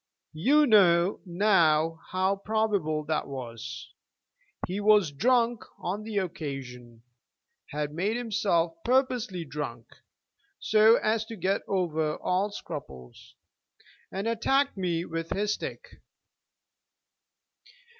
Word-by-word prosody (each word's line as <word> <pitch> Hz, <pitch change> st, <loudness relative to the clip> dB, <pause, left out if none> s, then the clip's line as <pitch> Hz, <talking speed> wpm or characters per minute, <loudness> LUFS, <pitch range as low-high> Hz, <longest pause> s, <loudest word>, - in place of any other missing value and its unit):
You 280 Hz, -, +4 dB
know 190 Hz, -5 st, +4 dB
now 165 Hz, -4 st, +3 dB
how 190 Hz, +2 st, +1 dB
probable 200 Hz, -8 st, 0 dB
that 155 Hz, 0 st, -1 dB
was. 130 Hz, -1 st, -7 dB, 0.7 s
He 185 Hz, +3 st, -4 dB
was 205 Hz, -6 st, +4 dB
drunk 235 Hz, -, +2 dB
on 195 Hz, +4 st, -3 dB
the 215 Hz, -1 st, -5 dB
occasion, 135 Hz, -, -5 dB, 0.7 s
had 150 Hz, 0 st, -3 dB
made 200 Hz, +8 st, -1 dB
himself 205 Hz, -8 st, 0 dB
purposely 245 Hz, -8 st, 0 dB
drunk, 135 Hz, -6 st, -6 dB, 0.7 s
so 220 Hz, +1 st, +5 dB
as 220 Hz, -1 st, +1 dB
to 225 Hz, -, -8 dB
get 195 Hz, 0 st, 0 dB
over 160 Hz, -5 st, 0 dB
all 190 Hz, +3 st, 0 dB
scruples, 70 Hz, -, -9 dB, 0.8 s
and 195 Hz, +3 st, -3 dB
attacked 270 Hz, +5 st, +1 dB
me 175 Hz, -3 st, -1 dB
with 165 Hz, -1 st, -5 dB
his 205 Hz, +1 st, 0 dB
stick. -, -, -8 dB
185 Hz, 105 wpm, -28 LUFS, 155-215 Hz, 0.8 s, so